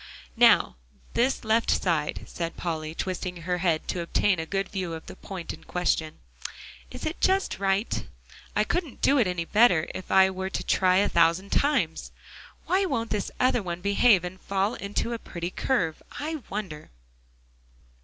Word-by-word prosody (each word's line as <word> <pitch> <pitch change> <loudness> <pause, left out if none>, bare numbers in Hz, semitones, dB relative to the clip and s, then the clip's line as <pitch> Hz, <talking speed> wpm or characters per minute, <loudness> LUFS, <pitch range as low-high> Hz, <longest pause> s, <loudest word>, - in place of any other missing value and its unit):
"Now - - +5 0.4
this 255 +2 +1
left 225 +1 +2
side," 160 -5 0
said 165 -1 -5
Polly, 160 -2 -3
twisting 180 -2 -4
her 180 +1 -1
head 170 -3 0
to 175 - -1
obtain 180 +2 +1
a 160 - -4
good 195 +1 -1
view 185 -4 -4
of 160 - -7
the - - -9
point 185 -3 -7
in - - -13
question, 165 -3 -1 0.7
"is - - -5
just 380 - +1
right; 195 +2 0 0.5
I - - +3
couldn't 335 -8 -3
do 280 0 +5
it 225 - +3
any 180 -2 -2
better 195 -6 +4
if 185 - -7
I 190 0 +5
were 190 0 -4
to - - -3
try 185 -1 +3
a 200 - +4
thousand 170 +4 +2
times. 230 - +1 0.5
Why 380 +2 +2
won't 230 -9 -2
this 210 -2 -1
other 255 -2 +3
one 175 -2 -5
behave, 200 0 +4
and 180 +1 -7
fall 200 +3 0
into 205 +4 -3
a 230 - -4
pretty 175 -3 -5
curve, 180 -13 -1 0.2
I 315 +2 -3
wonder?" 190 -7 -5
190 Hz, 165 wpm, -26 LUFS, 170-220 Hz, 0.7 s, Now